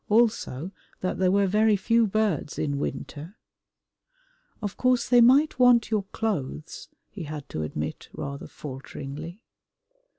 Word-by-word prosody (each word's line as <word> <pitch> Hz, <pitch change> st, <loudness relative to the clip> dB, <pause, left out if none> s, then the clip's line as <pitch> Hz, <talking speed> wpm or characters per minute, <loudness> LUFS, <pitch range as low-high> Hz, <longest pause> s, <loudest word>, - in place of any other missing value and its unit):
Also 210 Hz, -, +1 dB, 0.3 s
that 185 Hz, -, -2 dB
there 185 Hz, -1 st, +3 dB
were 200 Hz, +1 st, +3 dB
very 210 Hz, +2 st, +3 dB
few 230 Hz, +3 st, +3 dB
birds 200 Hz, -8 st, 0 dB
in 145 Hz, -2 st, -1 dB
winter. 145 Hz, +6 st, -5 dB, 1.2 s
"Of 205 Hz, -3 st, -4 dB
course 255 Hz, -1 st, +2 dB
they 245 Hz, -1 st, +6 dB
might 265 Hz, +4 st, +5 dB
want 245 Hz, -3 st, +5 dB
your 210 Hz, -3 st, +1 dB
clothes," 155 Hz, -9 st, -3 dB, 0.2 s
he 185 Hz, -6 st, -7 dB
had 150 Hz, -1 st, -7 dB
to 80 Hz, -, -4 dB
admit 75 Hz, 0 st, -4 dB
rather 140 Hz, 0 st, -6 dB
falteringly. 145 Hz, -, -8 dB
190 Hz, 130 wpm, -26 LUFS, 145-225 Hz, 1.2 s, they